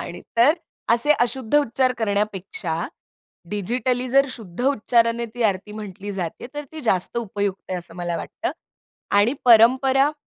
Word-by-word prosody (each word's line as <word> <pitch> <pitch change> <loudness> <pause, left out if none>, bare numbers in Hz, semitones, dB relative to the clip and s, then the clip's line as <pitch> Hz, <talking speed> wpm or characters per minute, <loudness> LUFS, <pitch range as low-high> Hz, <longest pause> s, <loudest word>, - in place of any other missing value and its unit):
आणि - - -7 0.2
तर 240 +6 +6 0.4
असे 240 +6 +2
अशुद्ध 245 +1 -1
उच्चार 255 -2 +1
करण्यापेक्षा, 200 -5 -2 0.6
डिजिटली 245 +5 -1
जर 275 +2 +4
शुद्ध 220 -5 -9
उच्चाराने 235 -2 +2
ती 245 - -2
आरती 200 0 0
म्हटली 205 -1 -7
जाते 185 +3 -5
तर 295 - -4
ती 315 - -7
जास्त 185 +1 0
उपयुक्त 200 -4 -3
आहे 180 - -1
असं 170 -1 -7
मला 175 -1 -2
वाटतं - - -4 0.7
आणि 230 +5 +3
परंपरा 260 +5 +5
225 Hz, 140 wpm, -23 LUFS, 195-255 Hz, 0.7 s, तर